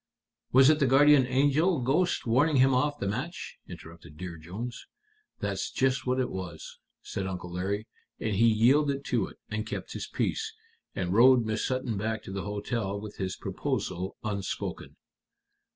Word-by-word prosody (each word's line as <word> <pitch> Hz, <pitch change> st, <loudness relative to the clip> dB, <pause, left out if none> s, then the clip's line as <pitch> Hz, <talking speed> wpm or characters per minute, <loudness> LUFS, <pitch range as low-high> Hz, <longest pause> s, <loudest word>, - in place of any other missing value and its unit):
"Was 135 Hz, +3 st, +7 dB
it 155 Hz, -, +1 dB
the 140 Hz, -, +3 dB
guardian 140 Hz, 0 st, +6 dB
angel 145 Hz, +6 st, +3 dB
ghost 150 Hz, +9 st, +1 dB
warning 135 Hz, +7 st, +3 dB
him 135 Hz, 0 st, +5 dB
off 145 Hz, +3 st, +1 dB
the 100 Hz, -, -3 dB
match?" 130 Hz, -, -4 dB
interrupted 85 Hz, -2 st, -11 dB
Dear 90 Hz, 0 st, -6 dB
Jones. 105 Hz, +10 st, -7 dB, 0.5 s
"That's -, -, -2 dB
just 130 Hz, 0 st, 0 dB
what 130 Hz, +1 st, +1 dB
it 130 Hz, -, 0 dB
was," 90 Hz, -4 st, -7 dB, 0.2 s
said 95 Hz, -1 st, -4 dB
Uncle 90 Hz, -2 st, -5 dB
Larry. 100 Hz, +4 st, -2 dB, 0.3 s
"And 110 Hz, -, -1 dB
he 115 Hz, +4 st, +5 dB
yielded 135 Hz, +5 st, +3 dB
to 115 Hz, -6 st, 0 dB
it, -, -, -14 dB
and 105 Hz, 0 st, -2 dB
kept 110 Hz, -, -6 dB
his -, -, -5 dB
peace, 440 Hz, 0 st, -2 dB, 0.4 s
and 90 Hz, -1 st, -1 dB
rowed 120 Hz, +2 st, +6 dB
Miss 110 Hz, 0 st, -1 dB
Sutton 130 Hz, -4 st, -2 dB
back 110 Hz, +2 st, -2 dB
to -, -, -8 dB
the 95 Hz, 0 st, -4 dB
hotel 105 Hz, 0 st, -3 dB
with 105 Hz, 0 st, -9 dB
his 95 Hz, -1 st, -3 dB
proposal 90 Hz, +1 st, -3 dB
unspoken." 100 Hz, -3 st, -4 dB
115 Hz, 165 wpm, -28 LUFS, 100-135 Hz, 0.5 s, Was